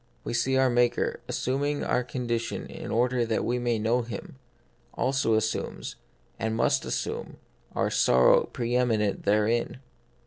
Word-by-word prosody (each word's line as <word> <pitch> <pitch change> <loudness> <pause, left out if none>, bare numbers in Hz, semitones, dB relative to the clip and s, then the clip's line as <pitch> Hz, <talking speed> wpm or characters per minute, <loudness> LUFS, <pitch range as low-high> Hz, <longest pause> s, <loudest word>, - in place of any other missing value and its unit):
We - - -4
see 130 +3 +1
that 130 - +4
our 130 - +4
Maker, 120 0 +1
assuming 145 +3 -1
our 125 - +1
condition 120 -2 -3
in - - -8
order 120 +1 +1
that 115 -1 -1
we 125 +1 0
may 120 -1 0
know 115 +3 +1
Him, 120 +3 -8 0.6
also 130 -4 +1
assumes, 110 0 -2 0.4
and 110 0 -1
must - - +1
assume, - - -4 0.4
our - - 0
sorrow, 65 0 +5
pre 120 0 -3
eminent 110 -5 +1
therein. 105 +5 +1
120 Hz, 145 wpm, -27 LUFS, 110-125 Hz, 0.6 s, sorrow